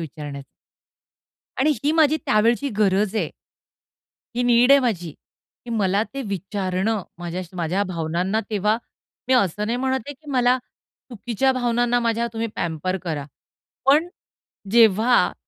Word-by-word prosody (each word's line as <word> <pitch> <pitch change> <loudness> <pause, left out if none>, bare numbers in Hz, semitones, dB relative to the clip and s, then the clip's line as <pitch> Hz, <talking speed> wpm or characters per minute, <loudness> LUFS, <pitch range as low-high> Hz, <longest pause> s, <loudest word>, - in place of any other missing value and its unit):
विचारण्याचा. 145 -3 -7 1.1
आणि 295 +4 +3
ही 295 - +3
माझी 315 -1 +4
त्यावेळची 230 +6 +2
गरज 205 0 +2
आहे. - - -1 1.1
ही 245 - +1
नीड 245 +1 +4
आहे 280 - +7
माझी, 190 -10 -1 0.5
की 240 - -8
मला 200 -3 +1
ते 275 - -3
विचारणं, 200 0 -2 0.2
माझ्या 175 +1 -4
माझ्या 175 +4 0
भावनांना 180 +3 -1
तेव्हा, 210 +1 +1 0.5
मी 260 - +4
असं 210 -3 +1
नाही 235 +2 -1
म्हणत 265 0 0
आहे 285 - -5
की 295 +2 -12
मला, 250 -1 +3 0.5
चुकीच्या 245 +3 0
भावनांना 245 -1 +1
माझ्या 230 0 0
तुम्ही 230 0 -2
पॅम्पर 170 +3 -2
करा. 155 -5 -3 0.6
पण 300 +5 +4 0.6
जेव्हा 230 +1 +5
220 Hz, 130 wpm, -22 LUFS, 185-245 Hz, 1.1 s, आहे